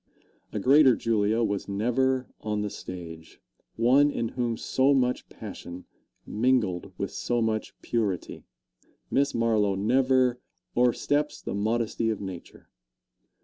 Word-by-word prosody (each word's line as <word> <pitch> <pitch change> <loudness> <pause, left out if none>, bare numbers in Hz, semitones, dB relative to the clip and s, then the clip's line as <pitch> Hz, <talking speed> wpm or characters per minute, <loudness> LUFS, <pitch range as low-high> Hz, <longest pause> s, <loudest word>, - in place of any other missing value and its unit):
A 105 - -3
greater 135 +3 +6
Julia 110 0 +1
was 100 -3 -2
never 125 +5 +1
on 105 -1 -2
the 105 - -3
stage 85 -3 -9 0.4
one 130 +6 +4
in 115 -5 -2
whom 120 -2 -2
so 135 +4 +2
much 125 -1 0
passion 90 +1 -9 0.4
mingled 110 -6 0
with - - -3
so 120 -1 -1
much 110 -1 -2
purity. 105 -7 -2 0.7
Miss 140 0 +1
Marlowe 110 -4 +2
never 125 +4 +2 0.4
"o'ersteps 145 +5 +1
the - - -4
modesty 115 +2 0
of 110 - -2
nature." 95 -4 -9
115 Hz, 120 wpm, -27 LUFS, 105-130 Hz, 0.7 s, greater